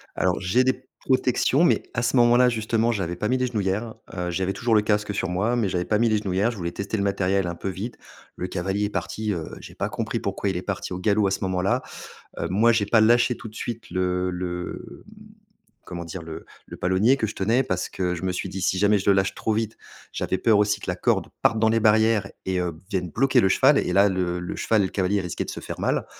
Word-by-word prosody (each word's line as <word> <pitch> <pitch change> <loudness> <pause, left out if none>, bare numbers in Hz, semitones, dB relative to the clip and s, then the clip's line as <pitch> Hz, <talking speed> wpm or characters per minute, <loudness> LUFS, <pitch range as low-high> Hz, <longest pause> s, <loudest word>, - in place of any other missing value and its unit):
Alors, 90 -1 +1
j'ai 100 +7 +2
des 130 0 -1
protections, 130 +3 +2
mais 175 - +3
à 115 - -1
ce 120 - +1
moment-là, 120 +1 +5
justement, 115 0 +1
j'avais 95 -6 -2
pas 105 +5 -2
mis 130 - +2
les 130 0 0
genouillères. 110 0 -2 0.2
Heu, 90 -1 -3
j'avais 95 +2 -1
toujours 115 0 +1
le 105 - +5
casque 105 -1 0
sur 95 - -1
moi, 100 +7 0
mais 115 -4 +1
j'avais 90 -1 -1
pas 105 - +1
mis 115 +2 +3
les 110 -1 +2
genouillères. 100 +3 0
Je 115 - -9
voulais 85 -2 -3
tester 100 +4 -3
le 100 - 0
matériel 95 -1 +1
un 85 - -3
peu 95 - -4
vite. 105 +6 -6 0.4
Le 90 - -4
cavalier 95 +3 -1
est - - -2
parti, 110 0 -3
heu, 85 -3 -5
j'ai - - -11
pas - - -2
compris - - -3
pourquoi 100 - -2
il 95 - -2
est - - -3
parti 95 -1 -4
au 90 - -4
galop 100 +1 +2
à - - -1
ce - - -1
moment-là. 95 +6 0 0.6
Heu, - - -1
moi, 110 +5 +4
j'ai 110 -3 +1
pas 110 +2 +4
lâché 120 +2 +4
tout - - -9
de 110 - -13
suite 115 0 -6
le 90 0 0
le 90 0 -6
mmh, - - -16 0.7
comment 85 -1 -6
dire? 85 +1 -7
Le 80 -1 -8 0.2
le - - -9
palonnier 95 +9 +3
que 115 - -1
je 105 - -6
tenais, 115 +7 +1
parce 90 -4 -2
que 90 -2 -2
je 85 - -7
me 95 - 0
suis 90 - -4
dit: 95 0 -5
«Si 95 - +1
jamais 105 +1 +4
je 100 - +1
le - - +5
lâche 95 0 +1
trop 110 - -1
vite», 110 0 -2 0.4
j'avais 95 - -2
peur 110 0 +4
aussi 105 0 +2
que - - -9
la 90 - -1
corde - - +1 0.2
parte 110 - +3
dans 110 0 +3
les 115 +1 +2
barrières 110 -2 +3 0.2
et 95 -1 0
heu, 90 -2 -2
vienne 90 -4 -2
bloquer 135 +7 +3
le 95 - +3
cheval - - +5
et - - -1
là, 100 +1 +5
le 90 -2 -1
le 90 - -5
cheval 110 -2 +2
et - - +1
le - - -7
cavalier 100 +1 +1
risquaient 90 -2 -3
de - - -6
se - - -6
faire - - -7
mal. - - 0
100 Hz, 260 wpm, -24 LUFS, 90-110 Hz, 0.7 s, moment-là